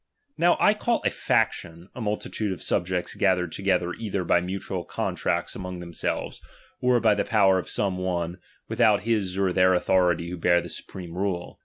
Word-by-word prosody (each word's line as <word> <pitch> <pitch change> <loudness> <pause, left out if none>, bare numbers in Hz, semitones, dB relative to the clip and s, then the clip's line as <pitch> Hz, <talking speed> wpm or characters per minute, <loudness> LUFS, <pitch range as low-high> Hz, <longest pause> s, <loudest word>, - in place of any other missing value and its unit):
Now 175 +1 +3
I 210 - +5
call 230 +2 -1
a - - +4
/action, 85 +3 -1
a 125 - -7
multitude 105 -1 -2
of 95 - -5
subjects 90 -1 -1
ga 95 - +3
thered 90 -2 -3
together 90 -2 0
either 100 -4 -3
by 85 0 +3
mutual 95 0 -4
contracts - - -2
among 90 0 -6
themselves, 85 -1 -4 0.4
or 125 -1 +3
by 110 -2 +4
the 100 - 0
power 95 -4 +3
of - - -6
some 95 -2 -1
one, 90 -1 -2 0.3
without 110 -2 +3
liis 105 -4 -1
or 95 -2 +1
their 95 0 +4
authority 90 -2 +2
who 90 - -5
bear 85 +1 +3
the - - -7
supreme 90 -3 -8
rule. 90 -2 -3
95 Hz, 180 wpm, -25 LUFS, 90-105 Hz, 0.4 s, I